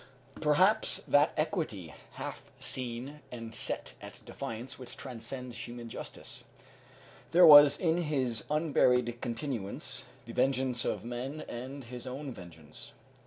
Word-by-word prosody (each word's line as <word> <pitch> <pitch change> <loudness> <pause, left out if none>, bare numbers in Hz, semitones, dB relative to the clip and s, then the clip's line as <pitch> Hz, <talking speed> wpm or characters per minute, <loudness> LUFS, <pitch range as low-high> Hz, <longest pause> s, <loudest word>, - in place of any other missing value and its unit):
Perhaps 175 +8 +3
that 145 +1 +5
equity, 150 - -2 0.2
half - - -7
seen 130 +3 -4
and 115 -2 -7
set 110 - -3
at - - -10
defiance, 115 +4 -6
which 125 - -6
transcends 125 0 -6
human 120 -1 -8
justice. - - -9 0.9
There 175 +1 +7
was 145 -2 +10
in 165 -2 +2
his 135 -9 0
unburied 125 -6 +2
continuance 115 -4 -4 0.2
the - - -8
vengeance 130 -2 +1
of 105 +1 -2
men 125 +5 -4
and 130 +3 -7
his 125 +1 -8
own 135 +2 -5
vengeance. 80 -6 -12
125 Hz, 120 wpm, -31 LUFS, 115-145 Hz, 0.9 s, was